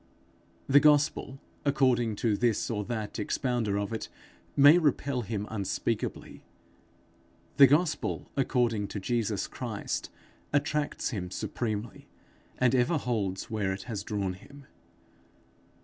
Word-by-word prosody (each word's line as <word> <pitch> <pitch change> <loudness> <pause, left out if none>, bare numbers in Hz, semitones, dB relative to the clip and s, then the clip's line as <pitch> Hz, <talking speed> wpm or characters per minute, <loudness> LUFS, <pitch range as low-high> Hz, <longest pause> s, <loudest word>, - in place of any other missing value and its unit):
The 140 +1 +7
gospel 145 -2 +2 0.2
according 130 -6 +2
to 110 -3 +3
this 120 +1 0
or 105 -2 -1
that 110 -2 -4
expounder 115 -2 -1
of 100 +2 -2
it, 110 - -4 0.5
may 145 +5 +8
repel 140 -4 0
him 105 -2 -3
unspeakably; 100 -3 -3 1.1
the 140 - +10
gospel 150 +2 0
according 120 -6 +1
to 100 - -5
Jesus 110 -1 -1
Christ, - - -4 0.4
attracts 150 0 0
him 95 -6 -4
supremely, 110 +3 -4 0.5
and 125 -1 +3
ever 130 +6 +3
holds 110 -6 -2
where 105 -3 0
it 95 - -7
has 110 -5 -4
drawn 100 -2 -2
him. 140 +9 -14
120 Hz, 115 wpm, -29 LUFS, 105-140 Hz, 1.1 s, the